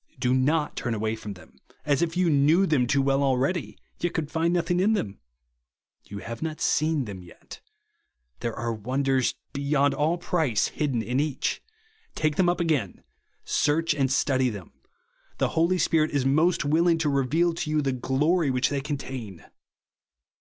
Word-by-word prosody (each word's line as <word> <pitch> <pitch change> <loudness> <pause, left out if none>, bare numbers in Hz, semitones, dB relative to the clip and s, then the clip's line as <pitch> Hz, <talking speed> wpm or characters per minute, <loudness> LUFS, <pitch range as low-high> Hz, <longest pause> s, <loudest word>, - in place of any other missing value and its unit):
Do 125 0 +1
not 150 +4 +1
turn 120 -2 -2
away 110 +1 -1
from 105 -2 -7
them, 90 - -18 0.3
as 145 0 +2
if 170 0 -1
you 185 -1 +2
knew 155 +5 +4
them 140 -8 +2
too 140 +2 +2
well 135 0 +2
already, 135 - 0 0.2
yet 175 - -2
could 150 -2 -2
find 165 +1 +1
nothing 175 0 +1
in 205 +4 +3
them. 100 - -3 0.9
You 100 - -8
have 115 +3 -7
not 155 -1 -4
seen 155 -3 +1
them 100 -4 -8
yet. 90 - -13 0.8
There 115 - -3
are 115 +1 -2
wonders 130 +4 0 0.2
beyond 140 0 +1
all 155 +3 +1
price 160 - 0
hidden 135 -7 -1
in 125 +3 -1
each. 145 -2 -1 0.5
Take 155 -1 0
them 180 0 +3
up 175 - 0
again. 150 - -1 0.4
Search 160 +2 +1
and 135 -3 0
study 130 -1 +2
them. 100 -5 -9 0.6
The - - +1
Holy 170 +3 +2
Spirit 155 -3 +2
is 140 -3 -1
most 155 +4 +2
willing 165 +3 +3
to 160 -2 -1
reveal 145 +5 +1
to 165 -1 -4
you 155 0 +1
the 135 - 0
glory 145 +6 +1
which 130 -1 +1
they 140 -1 -2
contain. 130 - -6
145 Hz, 170 wpm, -26 LUFS, 130-160 Hz, 0.9 s, knew